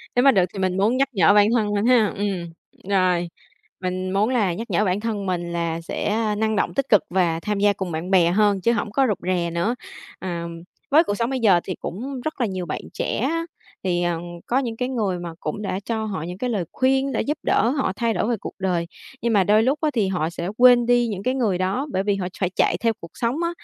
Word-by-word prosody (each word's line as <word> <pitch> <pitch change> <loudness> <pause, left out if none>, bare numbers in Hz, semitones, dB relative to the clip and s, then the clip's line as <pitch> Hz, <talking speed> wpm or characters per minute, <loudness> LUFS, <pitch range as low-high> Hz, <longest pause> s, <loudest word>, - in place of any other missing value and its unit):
Nếu 245 - +4
mà 275 - +7
được 185 -5 +3
thì 195 - -6
mình 185 0 0
muốn 220 +6 +2
nhắc 275 0 +2
nhở 190 0 +5
bản 205 0 +6
thân 210 -2 +1
mình 205 +2 0
ha. 240 -4 +5
Ừm, 185 -5 -3 0.4
rồi, 180 -3 +2 0.5
mình 185 0 -3
muốn 205 +4 +2
là 210 -9 +1
nhắc 225 +6 -6
nhở 210 - +2
bản 185 +2 +1
thân 210 -3 -3
mình 175 -2 -2
là 170 -1 -2
sẽ, 165 - -4
a, 215 -1 0
năng 220 0 0
động, - - 0
tích 275 -1 -1
cực 210 - +6
và 175 -3 +1
tham 205 +2 -2
gia 205 0 +4
cùng 190 -3 -4
bạn 165 +4 -4
bè 175 -2 +5
hơn 205 -1 +2
chứ 235 - +3
hổng 215 -2 -2
có 270 +3 +3
rụt 205 - 0
rè 175 -2 +1
nữa. 175 +9 0 0.4
Ờm, 170 -2 -5 0.3
với 315 +4 +7
cuộc 205 - -2
sống 235 +4 -1
bây 265 -1 -1
giờ 195 -6 +5
thì 185 - -4
cũng 255 +7 -5
rất 310 -3 -4
là - - +3
nhiều 185 -2 -4
bạn 150 - -4
trẻ - - -2
á, 330 +7 0 0.4
thì, 175 -1 0
ờ, 170 -1 0 0.3
có 255 +3 +1
những 230 -4 -3
cái 250 0 -1
người 205 -8 -1
mà 170 -1 -6
cũng 155 +7 -4
đã 190 -1 -2
cho 220 +1 -3
họ 190 -7 -4
những 180 +2 -6
cái 250 +3 -2
lời 200 -6 -1
khuyên 265 +1 +1
để 225 - 0
giúp 295 +2 -2
đỡ 230 - +2
họ 270 -7 0
thay 230 -1 0
đổi 215 - -1
về 235 - +2
cuộc - - -7
đời, 175 -3 0 0.3
nhưng 235 -1 +1
mà 195 -2 +5
đôi 215 +3 +4
lúc 275 +4 +1
á 310 - +2
thì 215 -5 +1
họ 175 -4 -1
sẽ 170 +1 -4
quên 245 -1 +7
đi 240 0 +3
những 200 -2 -4
cái 255 - +1
người 215 -8 +1
đó 195 +11 -1
bởi 190 - 0
vì 205 -1 +1
họ 185 -2 -3
phải 185 -2 +1
chạy - - +1
theo 230 -1 +1
cuộc 170 0 -11
sống 235 +3 -1
á. 340 - +1
205 Hz, 260 wpm, -23 LUFS, 180-235 Hz, 0.5 s, mà